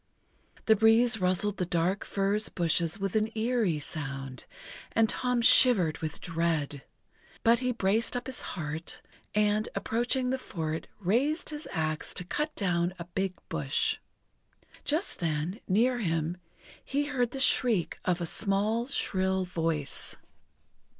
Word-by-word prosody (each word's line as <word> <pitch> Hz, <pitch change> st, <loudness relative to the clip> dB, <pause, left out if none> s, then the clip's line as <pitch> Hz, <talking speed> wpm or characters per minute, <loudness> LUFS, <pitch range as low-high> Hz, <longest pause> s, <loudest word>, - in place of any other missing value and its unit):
The 220 Hz, -, +6 dB
breeze 225 Hz, +1 st, +4 dB
rustled 185 Hz, +3 st, +1 dB
the 180 Hz, -, 0 dB
dark 175 Hz, +3 st, +1 dB
furze 200 Hz, +2 st, 0 dB
bushes 170 Hz, 0 st, 0 dB
with 195 Hz, 0 st, -2 dB
an 215 Hz, 0 st, +2 dB
eerie 220 Hz, -7 st, +1 dB
sound, 135 Hz, -4 st, -6 dB, 0.5 s
and 225 Hz, -1 st, +4 dB
Tom 250 Hz, +1 st, 0 dB
shivered 200 Hz, -11 st, +6 dB
with 155 Hz, -1 st, -4 dB
dread. 160 Hz, -4 st, -1 dB, 0.6 s
But 230 Hz, 0 st, +5 dB
he 250 Hz, 0 st, 0 dB
braced 225 Hz, +2 st, +1 dB
up 245 Hz, -, -5 dB
his 260 Hz, -1 st, -6 dB, 0.2 s
heart, 160 Hz, 0 st, -4 dB, 0.3 s
and, 210 Hz, 0 st, +2 dB
approaching 250 Hz, +3 st, 0 dB
the 265 Hz, -, -1 dB
fort, 160 Hz, -8 st, -4 dB
raised 255 Hz, -, +1 dB
his 300 Hz, +1 st, -6 dB
axe 155 Hz, -2 st, -2 dB
to -, -, -3 dB
cut 300 Hz, -, -2 dB
down 175 Hz, -2 st, 0 dB
a 170 Hz, -, -6 dB
big 185 Hz, +1 st, -2 dB
bush. -, -, 0 dB, 0.8 s
Just 315 Hz, +7 st, -1 dB
then, 165 Hz, +4 st, -1 dB
near 240 Hz, +6 st, +3 dB
him, 165 Hz, -3 st, -1 dB, 0.5 s
he 285 Hz, +2 st, 0 dB
heard 255 Hz, -4 st, 0 dB
the 270 Hz, -, -6 dB
shriek 240 Hz, -, +3 dB
of 180 Hz, -1 st, +1 dB
a 170 Hz, -, -2 dB
small, 210 Hz, +6 st, 0 dB
shrill 190 Hz, -8 st, 0 dB
voice. 165 Hz, -5 st, -3 dB
195 Hz, 135 wpm, -29 LUFS, 170-235 Hz, 0.8 s, The